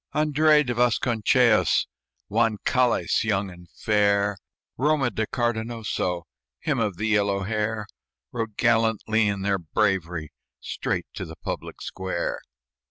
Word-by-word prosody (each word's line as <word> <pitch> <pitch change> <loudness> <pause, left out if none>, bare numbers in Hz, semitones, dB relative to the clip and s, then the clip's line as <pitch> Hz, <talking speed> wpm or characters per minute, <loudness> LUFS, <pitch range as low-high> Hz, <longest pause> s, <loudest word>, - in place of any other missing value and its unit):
Andres 150 0 +4
de 120 - -1
Vasconcellos, 120 -1 +3 0.4
Juan 110 -2 +1
Cales, 125 -1 +2
young 100 -3 0
and 90 -1 -14
fair, 100 -1 +1 0.4
Roma 140 -2 +1
de 110 0 -2
Cardenoso, 110 -6 -2 0.4
Him - - -1
of 105 -6 -1
the 105 - -2
yellow 100 -2 +2
hair 105 +1 -2 0.5
Rode 115 -3 -4
gallant 115 -2 +2
in 105 -3 +1
their 100 -1 +1
bravery, 85 -2 -1 0.3
Straight - - -3
to - - -5
the - - -9
public - - -6
square. 95 -2 -3
110 Hz, 120 wpm, -25 LUFS, 100-120 Hz, 0.5 s, Andres